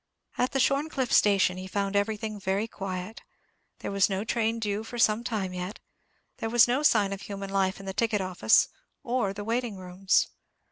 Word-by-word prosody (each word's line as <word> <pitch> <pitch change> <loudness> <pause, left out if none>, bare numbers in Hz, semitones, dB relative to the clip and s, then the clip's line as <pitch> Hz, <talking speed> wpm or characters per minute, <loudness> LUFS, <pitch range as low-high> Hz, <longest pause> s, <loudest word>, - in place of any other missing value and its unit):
At 250 - 0
the 270 - +1
Shorncliffe 275 -1 +1
station 195 -3 +4
he 185 0 -6
found 200 +1 -2
everything 215 +1 -1
very 195 +3 -1
quiet. 190 0 -6 0.6
There - - -4
was 200 +1 +3
no 195 +1 -1
train 225 0 0
due 210 -1 -2
for 240 +2 -8
some 230 -1 +3
time 205 -6 -2
yet; 180 +3 -5 0.6
there 225 - -3
was 240 +1 +6
no 250 +4 +1
sign 210 -9 +3
of 195 - -7
human 195 -1 -6
life 190 -1 0
in 195 - -10
the 190 - -4
ticket 210 +1 +1
office 185 -1 +3 0.4
or 245 -6 0
the 205 +1 -6
waiting 230 -1 -2
rooms. 185 +1 +1
205 Hz, 185 wpm, -27 LUFS, 195-230 Hz, 0.6 s, was